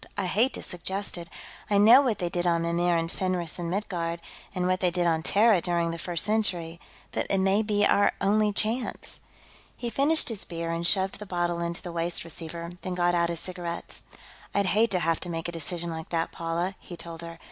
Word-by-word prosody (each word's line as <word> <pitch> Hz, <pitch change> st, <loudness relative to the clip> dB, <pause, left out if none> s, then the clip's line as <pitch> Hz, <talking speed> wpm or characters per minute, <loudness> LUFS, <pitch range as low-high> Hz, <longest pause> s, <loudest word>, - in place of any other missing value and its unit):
"I 200 Hz, -, 0 dB
hate 225 Hz, +8 st, +2 dB
to -, -, -4 dB
suggest 190 Hz, +3 st, -3 dB
it 170 Hz, -1 st, -7 dB, 0.4 s
I 205 Hz, -, +3 dB
know 225 Hz, +6 st, +8 dB
what 245 Hz, -6 st, 0 dB
they 175 Hz, -, -2 dB
did 175 Hz, +1 st, -1 dB
on 170 Hz, -1 st, +2 dB
Mimir, 170 Hz, +1 st, +2 dB
and 165 Hz, +1 st, -2 dB
Fenris, 180 Hz, -3 st, -1 dB
and 170 Hz, -1 st, -3 dB
Midgard, 170 Hz, -3 st, -2 dB, 0.4 s
and 180 Hz, -1 st, 0 dB
what 185 Hz, 0 st, +1 dB
they 180 Hz, -, +2 dB
did 175 Hz, 0 st, 0 dB
on 165 Hz, -1 st, +2 dB
Terra, 205 Hz, +2 st, +4 dB
during 170 Hz, -1 st, 0 dB
the 165 Hz, -, -5 dB
First 175 Hz, 0 st, +1 dB
Century. 180 Hz, -6 st, 0 dB, 0.3 s
But -, -, -2 dB
it 195 Hz, -, +2 dB
may 195 Hz, +2 st, +3 dB
be 210 Hz, -1 st, +2 dB
our 205 Hz, -, +4 dB
only 210 Hz, +1 st, +3 dB
chance." 220 Hz, +5 st, -2 dB, 0.6 s
He 240 Hz, -1 st, -4 dB
finished 290 Hz, +6 st, +3 dB
his 220 Hz, -4 st, -2 dB
beer 165 Hz, -1 st, -4 dB
and 170 Hz, +1 st, -1 dB
shoved 190 Hz, +1 st, +2 dB
the 210 Hz, -, -8 dB
bottle 175 Hz, -1 st, -1 dB
into 170 Hz, 0 st, -3 dB
the 175 Hz, -, -5 dB
waste 170 Hz, 0 st, -1 dB
receiver, 170 Hz, +1 st, -7 dB
then 185 Hz, -1 st, -4 dB
got 175 Hz, 0 st, +2 dB
out 170 Hz, -1 st, +2 dB
his 170 Hz, -1 st, -3 dB
cigarettes. 175 Hz, -2 st, -6 dB, 0.5 s
"I'd 200 Hz, 0 st, +3 dB
hate 220 Hz, +5 st, +3 dB
to 185 Hz, -, +1 dB
have 165 Hz, 0 st, +1 dB
to 175 Hz, -, -5 dB
make 165 Hz, -1 st, -3 dB
a -, -, -3 dB
decision 170 Hz, +1 st, -3 dB
like 160 Hz, 0 st, -6 dB
that, 165 Hz, -1 st, -1 dB
Paula," 170 Hz, +3 st, -2 dB
he 175 Hz, -, -10 dB
told 165 Hz, -1 st, -6 dB
her. 170 Hz, 0 st, -8 dB
175 Hz, 220 wpm, -27 LUFS, 170-200 Hz, 0.6 s, know